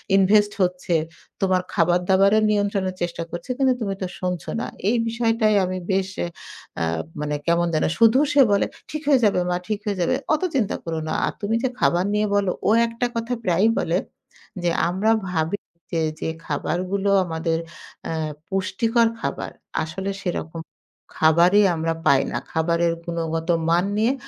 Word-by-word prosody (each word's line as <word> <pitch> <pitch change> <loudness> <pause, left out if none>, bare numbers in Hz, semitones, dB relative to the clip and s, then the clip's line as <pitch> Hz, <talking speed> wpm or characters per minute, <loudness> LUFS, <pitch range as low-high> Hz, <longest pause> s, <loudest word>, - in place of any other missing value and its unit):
Invest 205 +2 +4
হচ্ছে। 180 -1 0 0.5
তোমার 185 -1 +2
খাবার-দাবারের 190 +5 +3
নিয়ন্ত্রণের 200 -2 0
চেষ্টা 170 -1 -2
করছি। 170 +8 -7
কিন্তু 265 -2 +3
তুমি 200 -3 -1
তো 185 - -1
শুনছ 180 -2 -2 0.2
না।" - - -3 0.2
এই 240 - +2
বিষয়টাই 225 -2 +2
আমি 185 0 -3
বেশ 190 0 +1 0.2
এ - - -3 0.5
আ - - +2 0.4
মানে 150 0 -1
কেমন 170 +1 +3
যেন। 155 - +2
শুধু 230 +3 +5
সে 290 - +6
বলে, 200 - +3 0.2
"ঠিক 305 - -4
হয়ে 280 -3 +5
যাবে, 200 -3 +3
মা। 180 - +1
ঠিক 215 -2 -1
হয়ে 205 -2 -1
যাবে। 175 - +2 0.2
অত 310 - +1
চিন্তা 230 -7 +1
করো 165 -1 -3
না। - - -2
আর, - - -2
তুমি 210 +2 0
যে 260 - +2
খাবার 175 +2 +2
নিয়ে 210 0 +1
বলো" 200 -2 +2 0.2
ও - - +4 0.2
একটা 230 +1 -2
কথা 230 +1 -2
প্রায়ই 185 +3 +3
বলে। - - 0 0.7
যে, 175 - +2 0.2
"আমরা 195 +5 +1 0.2
ভাবি 165 +2 -1 0.4
যে, 165 - +1 0.2
যে - - -1 0.2
খাবারগুলো 185 +7 -1 0.2
আমাদের 165 -1 -1 0.5
আ - - -2 0.4
পুষ্টিকর 230 +4 +1
খাবার। - - -3 0.3
আসলে 190 +5 -4
সেরকম 165 -3 -4 0.6
খাবারই 170 +6 +5
আমরা 165 0 -1
পাই 135 -1 +5
না। - - -2
খাবারের 170 +1 +1
গুণগত 165 -1 -3 0.2
মান 175 +2 +3
নিয়ে 225 +4 +3
190 Hz, 165 wpm, -23 LUFS, 170-215 Hz, 0.7 s, সে